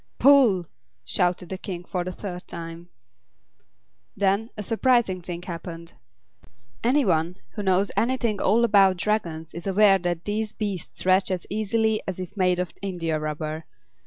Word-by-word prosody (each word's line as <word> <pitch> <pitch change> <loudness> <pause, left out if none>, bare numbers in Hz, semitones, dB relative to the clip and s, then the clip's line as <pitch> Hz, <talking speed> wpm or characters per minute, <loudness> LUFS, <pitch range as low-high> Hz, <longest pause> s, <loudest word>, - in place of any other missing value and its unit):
"Pull!" 255 -11 +5 0.4
shouted 175 +8 0
the 190 - -5
King 180 -3 -6
for 180 -1 -2
the 185 - -4
third 180 -1 -7
time. 170 +1 -8 1.3
Then 200 +3 +1
a 210 - -4
surprising 225 -4 +2
thing 175 0 -5
happened. 170 -1 -7 0.9
Any 265 +3 +3
one 170 0 +1
who - - -5
knows 190 0 +2
anything 230 0 +1
at - - -2
all 225 +5 +4
about 195 -4 +5
Dragons 170 -6 -2
is 170 +3 -6
aware 195 0 +5
that 175 -1 -2
these 215 +1 -2
beasts 200 -6 -4
stretch 185 +1 +3
as 185 -2 -2
easily 220 +1 +1
as 185 -1 -4
if 185 +2 -7
made 180 -2 +2
of 180 0 -3
india 170 -5 -2
rubber. 155 +1 -4
185 Hz, 155 wpm, -25 LUFS, 175-210 Hz, 1.3 s, Pull